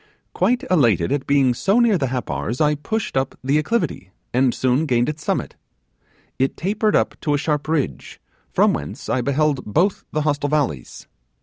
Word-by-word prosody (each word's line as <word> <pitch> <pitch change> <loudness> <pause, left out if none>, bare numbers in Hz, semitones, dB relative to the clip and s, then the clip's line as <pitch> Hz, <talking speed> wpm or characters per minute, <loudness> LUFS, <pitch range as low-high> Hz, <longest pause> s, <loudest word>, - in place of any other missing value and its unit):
'Quite 250 +2 +1
elated 115 - +3
at 145 -2 -1
being 140 -3 +3
so 195 - +2
near 235 -4 +4
the 140 -7 0
Happars, 125 -1 -3
I 150 -1 +3
pushed 215 +8 -3
up 135 0 -1
the 140 +3 +2
acclivity, 155 - -2 0.2
and 125 0 +3
soon 130 +6 +1
gained 120 -1 +2
its 150 0 -6
summit. - - -2 0.8
It 135 +1 0
tapered 210 +4 0 0.3
to 150 - 0
a - - +1
sharp 150 0 -1
ridge, 155 -3 -2 0.3
from - - +3
whence - - -6
I 125 - +1
beheld 140 +1 0
both 175 - 0
the 155 - -1
hostile 145 -1 0
valleys. 140 - -2
145 Hz, 170 wpm, -21 LUFS, 130-160 Hz, 0.8 s, near